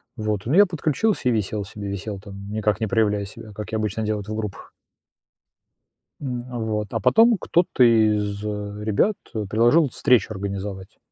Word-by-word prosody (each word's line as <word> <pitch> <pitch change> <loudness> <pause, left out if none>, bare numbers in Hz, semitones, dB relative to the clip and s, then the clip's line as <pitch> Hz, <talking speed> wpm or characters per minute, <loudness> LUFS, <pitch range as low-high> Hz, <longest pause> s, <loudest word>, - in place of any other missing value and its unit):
Вот, 105 -3 -2
ну, 130 - -1
я 205 +3 +7
подключился 165 - 0
и - - +3
висел 105 -2 -1
себе, 100 +1 -7
висел 100 +1 -5
там, 100 0 -10
никак 105 -2 0
не 110 - -1
проявляя 105 -2 +1
себя, 105 +2 -11
как 105 -2 -7
я 110 - 0
обычно 110 +1 -2
делаю 105 -1 -1
это 105 - -8
в - - -2
группах. 105 -2 -6 1.5
М, 125 -3 -4
вот, 110 -3 -2
а 115 - 0
потом 225 - +5
кто-то 170 -7 +2
из 105 -3 +3
ребят, 105 - -1 0.2
э, 110 -2 -2
предложил 120 +8 +4
встречу 125 -2 +3
организовать. 95 -1 -6
110 Hz, 165 wpm, -23 LUFS, 100-120 Hz, 1.5 s, я